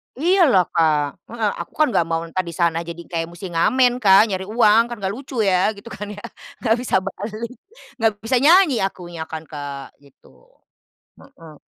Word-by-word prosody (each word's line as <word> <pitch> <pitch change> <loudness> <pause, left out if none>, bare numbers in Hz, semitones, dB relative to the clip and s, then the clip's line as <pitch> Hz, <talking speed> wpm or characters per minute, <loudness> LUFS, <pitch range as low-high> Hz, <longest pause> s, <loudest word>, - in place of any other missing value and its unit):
Iyalah 315 - +4
Kak, 150 -4 0
heeh, 220 -3 -1
aku - - -7
kan 305 -5 +2
enggak 170 -4 +1
mau 165 0 -1
entah 170 +3 -5
di 170 -2 -4
sana 170 -1 0
jadi 170 0 -7
kayak 165 -1 -4
musti 175 +1 -9
ngamen 245 +9 +2
Kak, 200 +1 +5
nyari 190 0 -3
uang, 225 +1 +4
kan 240 - -6
enggak 195 -2 -3
lucu 255 -1 -4
ya, 195 +2 +2
gitu 215 +3 -12
kan 205 - -7
ya, 205 +1 -9 0.4
enggak 225 -1 +3
bisa 250 - -2
balik, 215 +4 -6 0.5
enggak 225 -1 +2
bisa 250 +3 +1
nyanyi 315 -2 +5
akunya 175 -4 -4
kan 160 0 -7
Kak, 145 -3 -8
gitu. 140 - -23 0.7
Hmm. 165 - -16
195 Hz, 180 wpm, -21 LUFS, 165-235 Hz, 0.7 s, Kak